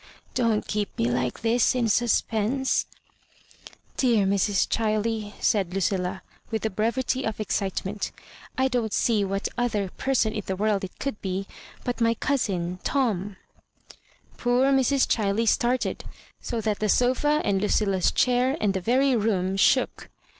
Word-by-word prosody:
" - - -34
Don't 225 -3 +1
keep 210 -1 -3
me 115 +1 +1
like 125 - -2
tiiis 235 +2 +3
in 240 -2 +1
suspense." 235 +3 +1 1.1
"Dear 235 -6 +3
Mrs. 200 0 +2
ChUey," 215 -1 -1
said 195 -5 +1
Lucflla^ 190 0 -1 0.3
with 220 -1 -3
the 220 - -1
brevity 235 +6 -1
of 220 -1 -3
excitement, 200 -1 -2 0.2
" - - -20
I 260 0 +3
don't 240 -5 -1
see 220 -4 +2
what 195 0 -2
other 210 -6 -1
person 245 -5 0
in 210 - -2
the 190 - -1
world 205 0 0
it 185 - -7
could 275 -6 -4
be 190 0 -3 0.4
but 245 -1 -3
my 230 0 +3
cousin 185 - -1
Tom." 210 -8 0 1.0
Poor 250 +3 +2
Mrs. 270 0 +3
ChUey 215 +1 0
started, 245 +2 +1 0.4
so 235 -2 -3
that 215 -1 -1
the 215 - 0
sofa 260 +7 +2
and 195 -1 +1
Lucilla's 200 -3 +1
chair 250 +3 +2
and 205 -2 +1
the 190 - -2
very 260 +6 +2
room 195 -4 0
shook. 255 +6 +2
215 Hz, 150 wpm, -25 LUFS, 195-245 Hz, 1.1 s, tiiis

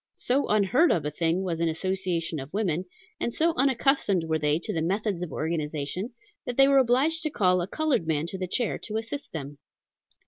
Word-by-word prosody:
So 270 +3 +1
unheard 215 - +3
of 160 - +1
a 150 - -1
thing 165 +4 0
was 170 -3 -2
an 165 0 +1
association 175 -2 -2
of 135 +2 -8
women, 185 -4 -1 0.3
and 235 - -1
so 330 +6 +2
unaccustomed 260 - +2
were 160 -1 0
they 150 0 +2
to 170 - -5
the 160 - -1
methods 195 +2 -1
of 180 - -4
organization, 155 +4 -3 0.4
that 245 - -3
they 270 0 +7
were 275 -1 +5
obliged 265 +6 +2
to 310 - -1
call 185 -9 +2
a 175 - -3
colored 295 - 0
man 155 -1 0
to 190 - -6
the 185 - -2
chair 235 +5 -1
to 215 0 -4
assist 230 +6 -5
them. 145 -2 -7
185 Hz, 205 wpm, -27 LUFS, 160-245 Hz, 0.4 s, they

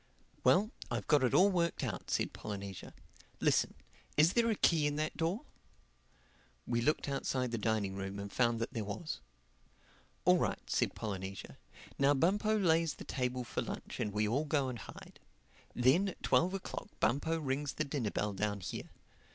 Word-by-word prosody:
"Well, 210 +5 +4 0.2
I've - - -2
got 150 -3 +4
it 125 - +2
all 200 +2 +6
worked 170 -3 0
out," - - -4
said - - 0
Polynesia. 100 -2 -6 0.4
"Listen: - - +2 0.4
is 155 +4 +6
there 235 -1 +3
a 220 - +2
key 160 -6 +3
in 145 - -1
that 155 +1 -1
door?" 180 - -1 1.2
We 120 -1 0
looked 150 +5 +1
outside 130 -2 -1
the 115 - -1
dining 105 -3 0
room 95 0 -4
and 100 0 -6
found 120 -2 +2
that 115 - -3
there 115 -4 -2
was. 105 +11 -4 1.1
"All - - +6
right," - - -2
said - - 0
Polynesia. 95 -3 -5 0.4
"Now 140 +1 +5
Bumpo 205 +8 +2
lays 165 -5 +3
the - - -9
table 125 -1 -2
for 120 - -3
lunch - - -6
and 105 - -1
we 105 +1 +1
all 135 +8 +1
go 145 -3 +1
and 120 -2 -5
hide. - - -11 0.6
Then 130 +11 +4
at - - -11
twelve 185 +3 +3
o'clock 195 - -5
Bumpo 145 +8 +1
rings 140 -1 -2
the 155 - -1
dinner 135 -6 -1
bell 105 0 -1
down 100 +1 -1
here. - - -5
135 Hz, 175 wpm, -34 LUFS, 110-165 Hz, 1.2 s, all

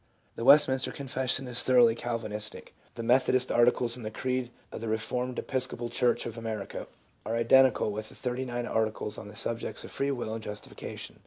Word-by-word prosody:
The - - -5
Westminster 135 0 +5
Confession 130 -1 -2
is 125 0 +5
thoroughly 120 -3 +5
Calvinistic. 115 -3 -4 0.2
The 115 - -5
Methodist 130 +1 +3
Articles 120 0 +3
and 125 - -9
the 110 - -3
creed 130 +2 -2 0.2
of - - -7
the 115 - -4
Eeformed 125 +3 -2
Episcopal 130 -2 -2
Church 125 0 +1
of 115 0 -6
America, 110 -3 -5 0.4
are 110 +2 -2
identical 115 -1 +4
with 110 +1 -5
the - - -14
Thirty 125 0 -3
nine 120 -1 -3
Arti 110 -2 +1
cles 105 -1 -6
on 110 - -9
the 105 - -11
subjects 115 0 -2
of - - -9
Free 140 - -1
will 120 -5 -3
and 115 - -4
Justification. 105 -1 -8
120 Hz, 185 wpm, -29 LUFS, 110-130 Hz, 0.4 s, Westminster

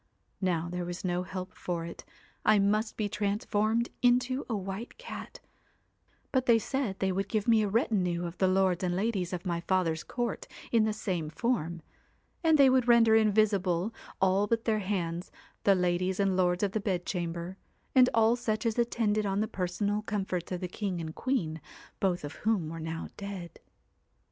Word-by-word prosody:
Now 170 -3 0
there 180 +1 -3
was 175 +2 -5
no 175 0 0
help 185 0 -6
for 170 -2 -3
it, 170 - -8 0.4
I 215 - +5
must 210 +2 +1
be 215 - 0
trans 205 +2 -1
formed 220 +3 +1
into 250 +2 +2
a 225 - 0
white 195 +4 -6
cat; 485 -1 -8 0.9
but 260 -1 +1
they 235 -1 +7
said 225 -3 -2
they 190 -1 0
would 195 +1 -2
give 215 -1 -1
me 225 -2 +5
a 210 - +1
retinue 185 -5 +1
of 170 0 -5
the 190 - +4
lords 185 -1 +2
and 175 -1 0
ladies 195 -3 -1
of 180 0 -4
my 170 -2 -1
father's 170 -3 0
court 240 -1 -3 0.2
in 225 -2 +4
the 215 - +1
same 185 -7 -2
form; 170 -5 -1 0.6
and 320 -1 +5
they 275 -2 +7
would 255 -2 +3
render 230 -2 +6
invisible, 205 -3 +2 0.3
all 190 +2 +3
but 230 +2 0
their 220 -2 +2
hands, 180 -3 -2 0.3
the 200 - +6
ladies 180 +1 0
and 200 -1 +3
224 185 -1 +3
lords 180 +2 0
of 200 - +1
the 220 - -1
bedchamber, 175 -2 -3 0.4
and 255 -1 +6
all 225 +1 +4
such 220 -2 -2
as 230 +1 0
attended 215 -3 +1
on 195 0 0
the 215 - +1
personal 200 +3 -1
comforts 195 -5 -3
of 180 0 -3
the 180 - -2
king 185 -1 -3
and 160 -1 -5
queen, 165 - -1 0.4
both 180 -4 0
of 145 +1 -7
whom 210 -8 0
were 165 +1 -6
now 160 +1 -4
dead. 195 -4 -7
195 Hz, 185 wpm, -30 LUFS, 180-220 Hz, 0.9 s, they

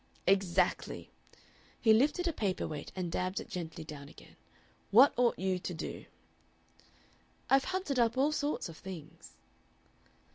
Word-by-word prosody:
"Exactly!" 190 -2 +1 0.7
He 220 - +5
lifted 295 +10 +3
a 335 - 0
paper 200 -8 -1
weight 150 -2 -6
and 180 -3 -3
dabbed 185 +3 -1
it - - -8
gently 165 -2 -5
down 145 -2 -9
again. - - -16 0.5
"What 245 +8 +7
ought 245 -1 +3
you 185 0 0
to 180 - -5
do?" 160 - -6 1.5
"I've 270 0 +5
hunted 370 -8 -1
up 235 +1 +2
all 280 +3 +3
sorts 295 -5 -1
of 165 -2 -10
things." 165 -3 -10
190 Hz, 140 wpm, -32 LUFS, 170-270 Hz, 1.5 s, What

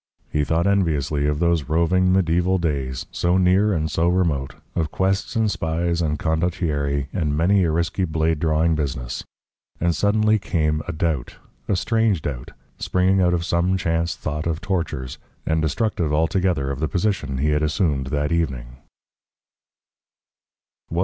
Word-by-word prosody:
He 75 - +1
thought 80 +3 +1
enviously 80 -7 +1
of 75 0 0
those 85 -4 +1
roving, 90 +3 +2
mediaeval 90 0 +2
days, 70 -7 -2
so 90 +1 +1
near 95 +3 +3
and 80 -4 -1
so 80 +3 +1
remote, 85 -7 0 0.2
of 80 -3 0
quests 95 - -1
and 110 -2 +2
spies 85 0 -1
and 75 -2 0
condottieri 80 -4 -1
and 75 -4 -1
many 95 +4 +3
a - - +1
risky 85 +3 0
blade 80 -1 0
drawing 80 +1 +2
business. 65 -5 -3 0.6
And 85 0 +1
suddenly 110 +1 +2
came 75 -5 0
a - - -1
doubt, 80 -6 -2 0.3
a 100 - +1
strange 105 -2 +1
doubt, 65 -3 -4 0.3
springing 95 +1 +2
out 90 -1 +3
of 85 -1 -2
some 90 +2 +1
chance 85 -1 -1
thought 75 +2 -4
of 80 -1 -1
tortures, 80 -10 -3 0.3
and 80 0 +1
destructive 85 - 0
altogether 80 -2 +1
of 70 - -4
the 80 - 0
position 90 -7 -1
he 75 +3 +1
had 75 0 +1
assumed 75 -3 0
that 75 +3 -1
evening. 65 -7 -2
80 Hz, 150 wpm, -22 LUFS, 75-90 Hz, 0.6 s, near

